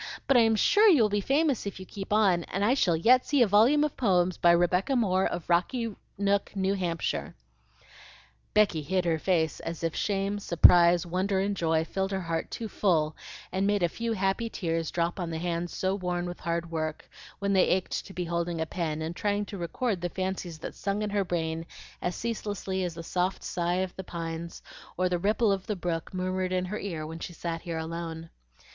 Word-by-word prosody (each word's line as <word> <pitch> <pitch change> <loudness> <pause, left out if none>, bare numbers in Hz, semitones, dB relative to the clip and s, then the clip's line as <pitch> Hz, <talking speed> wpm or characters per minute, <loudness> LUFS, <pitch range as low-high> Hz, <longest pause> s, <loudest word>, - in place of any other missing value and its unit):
But 275 - +3
I'm 225 -2 +5
sure 415 - +5
you 300 - +6
will 210 - +3
be 205 0 0
famous 275 -1 +1
if 200 - -6
you 190 - -8
keep 195 +1 -8
on, 195 -5 +3
and 195 +2 -1
I 240 - +4
shall 185 -11 +2
yet 250 +9 +5
see 285 -4 +3
a - - +2
volume 230 +9 +5
of 300 - -1
poems 185 -6 +2
by 175 - +3
Rebecca 180 +8 +3
Moore 190 -6 +2
of 175 -2 -5
Rocky 215 +7 +1 0.2
Nook, 200 +1 0
New 195 0 +1
Hampshire." 175 -4 -2 1.2
Becky 205 -7 +4
hid 185 +4 -1
her 165 -2 +1
face 160 -3 +1
as 165 0 -6
if 165 -1 -1
shame, 200 0 -1
surprise, 175 -1 +6
wonder, 190 +3 0
and 200 +1 0
joy 160 -2 +1
filled 190 +3 -2
her 195 -1 -2
heart 165 -2 -3
too 225 - -5
full 160 -7 +1 0.4
and 190 +1 0
made 205 -2 +1
a - - +5
few 230 +5 -3
happy 195 +3 0
tears 165 -5 -2
drop 170 +2 -1
on 175 -2 -2
the 160 - -3
hands 170 +1 -2
so 190 0 -1
worn 180 -2 -2
with 175 0 -6
hard 170 0 -2
work, 155 -1 -3 0.3
when 200 0 0
they 190 - +4
ached 185 0 -1
to - - -11
be 180 -1 -3
holding 170 0 -2
a 160 - 0
pen 160 -2 -3
and 165 +2 -4
trying 205 +1 0
to 200 - -7
record 190 +3 -2
the 175 - -1
fancies 185 -2 -4
that 155 - -7
sung 200 +2 -2
in 210 - -2
her 200 -1 +1
brain 165 -2 -2 0.4
as 180 - -2
ceaselessly 205 -4 -3
as 175 -2 -3
the 165 - -7
soft 180 +3 -1
sough 175 +1 0
of 185 - -6
the 190 - -6
pines 165 -1 -6 0.3
or 185 +1 +2
the 175 -1 0
ripple 210 +3 +2
of 195 0 -2
the 210 - -1
brook 170 -3 -3
murmured 185 0 -2
in 185 0 0
her 210 +4 -4
ear 165 -6 -4
when 160 +1 -7
she 175 - -6
sat 165 0 -4
here 165 -2 -4
alone. 165 0 -5
185 Hz, 215 wpm, -28 LUFS, 170-200 Hz, 1.2 s, you